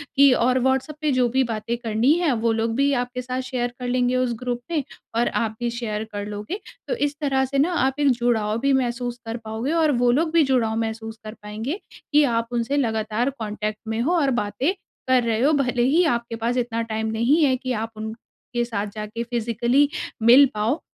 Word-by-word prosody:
की 280 0 +7
और 250 +1 +2
व्हाट्सएप 265 +4 0
पे 305 -2 +1
जो 255 -1 +3
भी 265 +3 +2
बातें 230 -1 -3
करनी 235 +3 +1
है, 340 -5 +2
वो 230 0 +1
लोग 225 0 0
भी 280 +2 +2
आपके 250 0 -4
साथ 255 +1 -3
शेयर 245 -2 -2
कर 250 - -4
लेंगे 250 0 +1
उस 255 -1 +1
ग्रुप 245 -1 -3
में 310 -4 0 0.3
और 240 - +3 0.2
आप 220 -1 -3
भी 240 0 -1
शेयर 215 -3 -3
कर 205 0 -3
लोगे। 210 - -5 0.3
तो - - -1
इस 290 -7 -1
तरह 270 -2 +1
से 275 +1 -3
ना 315 +6 +2
आप 270 -3 +1
एक 285 - +4
जुड़ाव 230 -3 +1
भी 275 +2 +2
महसूस 245 -1 -1
कर 225 +1 -4
पाओगे 220 +6 -3
और 320 -2 +3
वो 245 0 +3
लोग 315 +5 +1
भी 335 -2 +5
जुड़ाव 245 -5 +1
महसूस 225 0 -4
कर 215 - -6
पाएँगे, 220 - -4 0.3
कि 295 +1 +5
आप 230 -4 +1
उनसे 240 +4 0
लगातार 220 -1 0
कॉन्टेक्ट 215 0 -3
में 220 +1 -2
हो 310 +9 +1
और 280 -4 +2
बातें 210 - -1 0.3
कर 255 -1 +4
रहे 225 -1 0
हो, 285 +4 +4
भले 250 -4 +1
ही 300 +8 +4
आपके 235 -2 -2
पास 230 +2 -1
इतना 235 -2 -1
टाइम 220 -1 -2
नहीं 250 +9 +3
है, 265 -3 +4
कि 255 0 -4
आप 225 -1 -2
उनके 225 +2 -5
साथ 210 -3 -3
जाके 215 +2 -4
फ़िजिकली 240 +4 +1 0.3
मिल 245 +5 +8
पाओ। 225 +9 0
240 Hz, 210 wpm, -23 LUFS, 225-265 Hz, 0.3 s, मिल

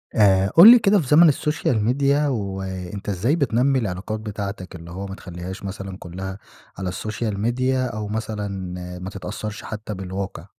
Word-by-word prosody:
آآ 95 -2 +4
قُل 190 +8 +10
لي 245 - +8
كده، 205 -1 +4
في 150 - -3
زمن 160 +4 +7
الsocial 150 -3 -1
media، 140 +3 +2
وأنت 95 -4 -4
إزاي 105 - +1
بتنمّي 135 -2 +2
العلاقات 105 0 -3
بتاعتك؟ 100 -4 -6
اللي 85 0 -10
هو 95 +3 -5
ما 95 - -7
تخليهاش 90 +1 -8
مثلًاً 95 -1 -6
كلها 95 +1 -7 0.4
على 95 -1 -3
الsocial 110 +3 -3
media، 120 +5 0 0.2
أو 105 -1 -4
مثلًا 105 -4 -4 0.2
آآ - - -8
ما 90 +1 -5
تتأثرش 105 +2 -6
حتى 110 0 -6
بالواقع. 95 -2 -5
105 Hz, 165 wpm, -22 LUFS, 95-120 Hz, 0.4 s, قُل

